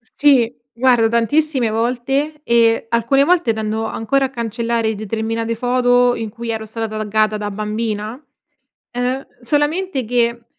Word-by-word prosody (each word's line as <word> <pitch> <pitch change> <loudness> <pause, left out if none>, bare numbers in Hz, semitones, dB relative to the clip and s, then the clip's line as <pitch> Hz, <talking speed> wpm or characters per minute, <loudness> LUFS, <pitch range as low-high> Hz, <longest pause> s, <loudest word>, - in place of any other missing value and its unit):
Sì. 265 -6 +4 0.2
Guarda 240 -2 +4
tantissime 250 +2 +1
volte 255 +7 -1
e 230 -1 +3
alcune 235 +4 +3
volte 340 -8 +2
tendo 220 0 -2
ancora 245 +5 0
a 265 - -3
cancellare 230 -1 -1
determinate 225 +2 -2
foto, 245 +1 +2
in 225 -2 -4
cui 235 0 -7
ero 220 -1 -3
stata 225 +1 -4
t 215 - -6
taggata 215 0 +1
da 205 0 -4
bambina. 215 +2 -3 0.7
Ehm, 250 +2 -2
solamente 295 +4 0
che, 235 0 0
235 Hz, 135 wpm, -19 LUFS, 220-255 Hz, 0.7 s, Sì